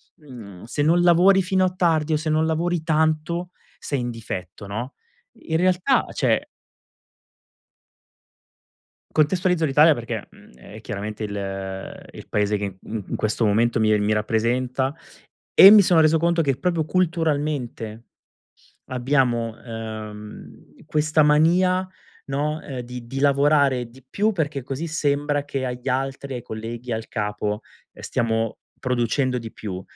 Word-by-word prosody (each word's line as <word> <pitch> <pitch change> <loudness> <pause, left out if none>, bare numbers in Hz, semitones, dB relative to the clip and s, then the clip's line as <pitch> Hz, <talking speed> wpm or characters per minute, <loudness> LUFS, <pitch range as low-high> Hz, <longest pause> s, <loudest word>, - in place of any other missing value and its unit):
mhmm, 115 - -12
se 135 +5 -3
non 165 +4 +4
lavori 180 +3 +5
fino 185 0 +1
a 185 - -1
tardi 160 -3 +1
o 155 - +3
se 155 +1 -3
non 155 +1 +2
lavori 170 +1 0
tanto 160 +2 0 0.3
sei 140 -3 -3
in 120 - -3
difetto, 100 -4 -7
no? 120 +6 -5 0.5
In 160 0 -1
realtà, 185 +8 +2
cioè - - +1 2.7
Contestualizzo 175 +2 +2
l'Italia 150 +2 +5
perché, 115 -4 -5
mhmm, - - -18
è 60 - -12
chiaramente 105 +2 -5
il 95 -2 -5
il - - -11
Paese 105 0 +1
che, 100 -2 -5
mhmm, 110 -1 -5
in - - -2
questo 110 +1 0
momento 115 +3 +2
mi 110 -1 +3
mi 105 +1 +1
rappresenta, 125 +6 0 0.6
e 195 - +11
mi 210 -1 +9
sono 175 -2 +4
reso 160 +1 +4
conto 170 0 +2
che 135 -3 0
proprio 165 +1 0
culturalmente 150 -10 -1 0.8
abbiamo, 125 -3 0
ehm, 110 -1 -9
questa 155 0 +2
mania, 180 +5 +3 0.4
no, 150 +3 -2
ehm, 130 -4 -6
di 120 0 -8
di 135 +2 -5
lavorare 140 -3 +3
di 130 +2 -18
più 215 +7 +1
perché 150 -6 -2
così 135 +6 -4
sembra 145 -2 0
che 135 -2 -3
agli 125 +1 -4
altri, 135 +1 -2
ai 120 - -5
colleghi, 115 +2 -7
al 110 0 -3
capo, 105 -1 -2 0.3
ehm, - - -14
stiamo 115 -1 -1 0.2
producendo 125 +1 0
di 115 -2 -8
più. 95 -3 -6
135 Hz, 140 wpm, -23 LUFS, 115-160 Hz, 2.7 s, e